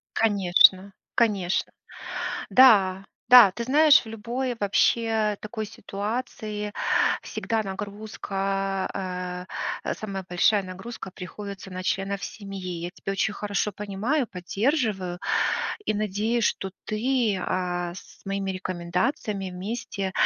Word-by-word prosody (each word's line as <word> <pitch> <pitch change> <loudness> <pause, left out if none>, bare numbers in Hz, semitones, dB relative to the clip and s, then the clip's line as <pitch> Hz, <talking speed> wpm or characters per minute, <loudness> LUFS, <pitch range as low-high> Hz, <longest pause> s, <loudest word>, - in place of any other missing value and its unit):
Конечно 195 -2 +4 0.2
конечно. 200 -6 +1 0.8
Да 195 -7 +6 0.2
да. 245 -5 +10
Ты 235 +4 -4
знаешь, 290 +3 +6
в - - -13
любой 240 +4 -3
вообще 215 +1 +2
такой 215 +1 -5
ситуации 210 0 -4 0.5
всегда 225 -1 -2
нагрузка, 195 -2 -3 0.4
э, - - -2
э, - - 0
самая 195 -3 -5
большая 195 +3 +3
нагрузка 190 +2 -8
приходится 195 +2 -8
на 185 0 -5
членов 195 +1 -1
семьи. 190 -4 -6
Я 175 - -4
тебя 195 +1 -5
очень 205 +2 0
хорошо 205 0 -2
понимаю, 210 +9 -1
поддерживаю. 195 - -1 0.7
И - - 0
надеюсь, 215 +3 0
что 190 - 0
ты, 225 -1 +1
а, 175 -1 -2
с 185 - -14
моими 195 0 -2
рекомендациями 185 +3 -2
вместе 195 0 -4
200 Hz, 110 wpm, -26 LUFS, 190-220 Hz, 0.8 s, да